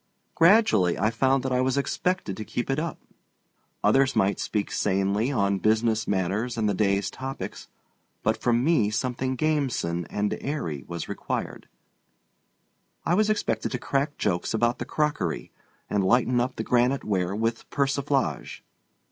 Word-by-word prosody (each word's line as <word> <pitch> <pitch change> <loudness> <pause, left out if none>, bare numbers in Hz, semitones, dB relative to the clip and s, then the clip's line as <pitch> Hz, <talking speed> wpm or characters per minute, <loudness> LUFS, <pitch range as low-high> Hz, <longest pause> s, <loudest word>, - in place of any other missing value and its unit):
Gradually 165 - +4
I 110 +3 +1
found 130 +3 +2
that 130 - -2
I 125 0 +2
was 130 +1 +1
expected 140 - -1
to 110 - -5
keep 120 +4 -3
it 135 - 0
up. 165 0 -3 0.9
Others 135 0 +3
might 100 +1 +2
speak 105 -2 -2
sanely 100 +5 +1
on 100 -6 +1
business 110 +1 +1
matters 100 +5 -1
and 110 -2 +1
the 105 - +1
day's 100 0 +1
topics, 135 +1 -6 0.6
but - - +2
from 120 0 +2
me 140 -9 +3
something 130 +3 -1
gamesome 130 - -1
and 105 0 -1
airy 85 - -3
was 85 -1 -5
required. - - -4 1.4
I 170 - +2
was 215 +3 +3
expected 115 - 0
to - - 0
crack 140 +3 -1
jokes 90 +1 -1
about 120 +2 +1
the - - -3
crockery 150 - -1 0.4
and 100 -2 0
lighten 120 +5 +3
up 125 +2 -1
the - - -3
granite 125 +2 +2
ware 95 -2 -1
with 115 +2 -2
persiflage. 140 -1 -1
120 Hz, 150 wpm, -26 LUFS, 100-135 Hz, 1.4 s, Gradually